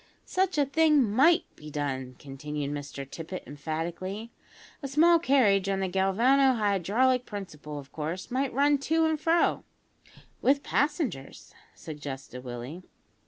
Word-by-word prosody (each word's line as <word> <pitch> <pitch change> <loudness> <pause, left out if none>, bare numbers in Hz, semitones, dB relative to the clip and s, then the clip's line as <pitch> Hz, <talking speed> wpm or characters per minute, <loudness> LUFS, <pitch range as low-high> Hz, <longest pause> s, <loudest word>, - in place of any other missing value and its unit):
"Such 375 -2 0
a 290 - +4
thing 300 0 +4
might 320 - +5
be 150 - -11
done," 135 -3 -3
continued 145 +1 -5
Mr 145 -1 -6
Tippet 165 +6 -7
emphatically; 170 +9 -5 0.5
"a 275 - -4
small 330 +5 +5
carriage 210 - +3
on 195 -1 0
the 190 - 0
galvano 235 +9 +3
hydraulic 220 +5 +2
principle, 155 -8 -7
of 140 -1 -10
course 160 +7 -5
might 265 +1 0
run 285 +2 +3
to 320 +3 +1
and 315 -1 0
fro 335 +2 +2 0.4
" - - -25
"With 280 +1 +3
passengers," 285 - -2 0.2
suggested 135 -4 -8
Willie. 125 +7 -7
195 Hz, 135 wpm, -28 LUFS, -, 0.5 s, might